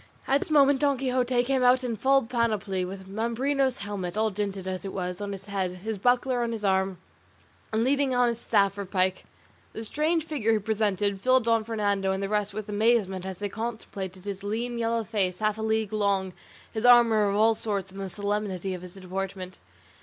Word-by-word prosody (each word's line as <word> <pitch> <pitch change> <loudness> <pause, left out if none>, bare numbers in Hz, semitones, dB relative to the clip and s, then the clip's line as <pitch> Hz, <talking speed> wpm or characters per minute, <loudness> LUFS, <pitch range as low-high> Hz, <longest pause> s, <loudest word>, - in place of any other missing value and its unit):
At 275 +1 +3
this - - -4
moment 285 -2 +5
Don 280 -2 +2
Quixote 250 -1 +1
came 265 +1 +1
out 250 +1 +4
in 240 -2 -2
full 270 +5 +3
panoply, 220 -5 -1
with 190 +1 -7
Mambrino's 245 +6 0
helmet, 195 -2 -4
all 220 0 +2
dinted 195 -1 -3
as 185 -1 -3
it 195 - -5
was, 180 0 -4
on 205 0 -3
his 195 0 -7
head, 195 -3 -2
his 220 -2 -3
buckler 245 +2 +2
on 235 -1 -1
his 215 -2 -4
arm, 190 -1 +1 0.7
and 220 +1 +1
leaning 270 0 +2
on 245 0 +4
his 235 -1 -1
staff 200 -2 +2
or 200 - -3
pike. 185 0 0 0.5
The 220 - -6
strange 315 +6 0
figure 255 -9 0
he - - +3
presented 205 -2 0
filled 255 +1 +4
Don 230 -1 +2
Fernando 205 -3 0
and 190 +1 -2
the 195 - -2
rest 210 -1 0
with 215 0 -6
amazement 205 -3 +1
as 190 -2 -5
they 205 - -3
contemplated 200 -4 -6
his 200 -1 -5
lean 235 +4 -2
yellow 230 0 0
face 195 -4 -1
half 215 +1 0
a - - -3
league 220 -1 0
long, 200 -3 0 0.4
his 220 - -3
armour 230 -4 +6
of 200 - -1
all 220 +2 +5
sorts, 200 -3 -3
and 195 +1 -8
the 195 - -4
solemnity 200 -2 -2
of 180 - -6
his 180 0 -10
deportment. 190 0 -5
210 Hz, 205 wpm, -27 LUFS, 195-235 Hz, 0.7 s, armour